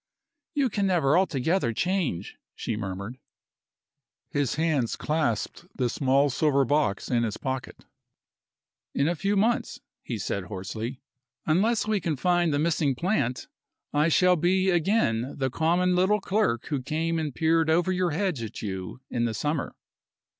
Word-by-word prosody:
"You 275 Hz, -5 st, +2 dB
can 200 Hz, -1 st, 0 dB
never 165 Hz, -6 st, +3 dB
altogether 160 Hz, -6 st, +1 dB
change," 170 Hz, -, -1 dB, 0.2 s
she 115 Hz, -, -3 dB
murmured. 100 Hz, +4 st, -5 dB, 1.1 s
His 140 Hz, -4 st, 0 dB
hands 150 Hz, -7 st, +1 dB
clasped 150 Hz, +1 st, -2 dB
the 125 Hz, -2 st, 0 dB
small 140 Hz, +1 st, +2 dB
silver 140 Hz, 0 st, +2 dB
box 145 Hz, -7 st, 0 dB
in 120 Hz, -1 st, +3 dB
his 110 Hz, -2 st, -2 dB
pocket. 130 Hz, -2 st, -5 dB, 1.1 s
"In 140 Hz, -, +2 dB
a 170 Hz, -, +2 dB
few 195 Hz, +5 st, 0 dB
months," 225 Hz, +4 st, +1 dB, 0.2 s
he -, -, -4 dB
said 100 Hz, -2 st, -3 dB
hoarsely, 110 Hz, +6 st, -6 dB, 0.4 s
"unless 210 Hz, +9 st, +2 dB
we 215 Hz, -2 st, 0 dB
can 165 Hz, -3 st, -1 dB
find 175 Hz, +3 st, +2 dB
the 145 Hz, -, +1 dB
missing 150 Hz, -3 st, +1 dB
plant, 130 Hz, -, -1 dB, 0.5 s
I 150 Hz, +2 st, +3 dB
shall 180 Hz, +2 st, +4 dB
be 185 Hz, +3 st, +2 dB
again 165 Hz, -, +1 dB
the 130 Hz, -2 st, -1 dB
common 175 Hz, +5 st, +2 dB
little 190 Hz, +4 st, +3 dB
clerk 195 Hz, -, 0 dB
who 145 Hz, -4 st, -1 dB
came 165 Hz, +4 st, -1 dB
and 155 Hz, -2 st, -2 dB
peered 160 Hz, +4 st, +2 dB
over 175 Hz, +3 st, +3 dB
your 180 Hz, -1 st, +1 dB
hedge 175 Hz, -4 st, -1 dB
at 115 Hz, 0 st, -6 dB
you 95 Hz, +4 st, -5 dB
in 120 Hz, -1 st, 0 dB
the 115 Hz, -2 st, -2 dB
summer." 150 Hz, +5 st, -2 dB
155 Hz, 150 wpm, -26 LUFS, 125-180 Hz, 1.1 s, shall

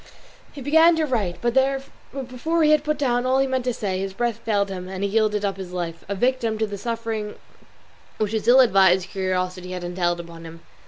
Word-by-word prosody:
He 285 Hz, -, -10 dB
began 320 Hz, +5 st, +5 dB
to 320 Hz, -1 st, +1 dB
write, 215 Hz, -10 st, -1 dB
but 240 Hz, -1 st, +1 dB, 0.7 s
before 320 Hz, +7 st, -1 dB
he 305 Hz, -, +5 dB
had 305 Hz, -1 st, +4 dB
put 305 Hz, 0 st, -1 dB
down 245 Hz, -4 st, +1 dB
all 255 Hz, +1 st, +2 dB
he 270 Hz, -, +3 dB
meant 260 Hz, -1 st, -2 dB
to 250 Hz, -, +1 dB
say, 195 Hz, -5 st, -3 dB
his 195 Hz, 0 st, -4 dB
breath 235 Hz, 0 st, -1 dB
failed 205 Hz, -3 st, 0 dB
him 185 Hz, -1 st, -6 dB
and 190 Hz, +1 st, -5 dB
he 200 Hz, -, 0 dB
yielded 210 Hz, -1 st, +1 dB
up 195 Hz, -1 st, -2 dB
his 185 Hz, -2 st, -8 dB
life, 165 Hz, -2 st, -4 dB
a 200 Hz, -, -1 dB
victim 240 Hz, 0 st, 0 dB
to 220 Hz, -, +1 dB
the 205 Hz, -2 st, -7 dB
suffering 225 Hz, -2 st, -4 dB, 0.8 s
which 215 Hz, -1 st, -1 dB
his 220 Hz, -1 st, -2 dB
ill 255 Hz, +2 st, +8 dB
advised 190 Hz, -5 st, +4 dB
curiosity 185 Hz, -1 st, -2 dB
had 180 Hz, -1 st, -5 dB
entailed 175 Hz, -1 st, -1 dB
upon 170 Hz, -1 st, -10 dB
him. 165 Hz, 0 st, -11 dB
210 Hz, 215 wpm, -23 LUFS, 185-250 Hz, 0.8 s, ill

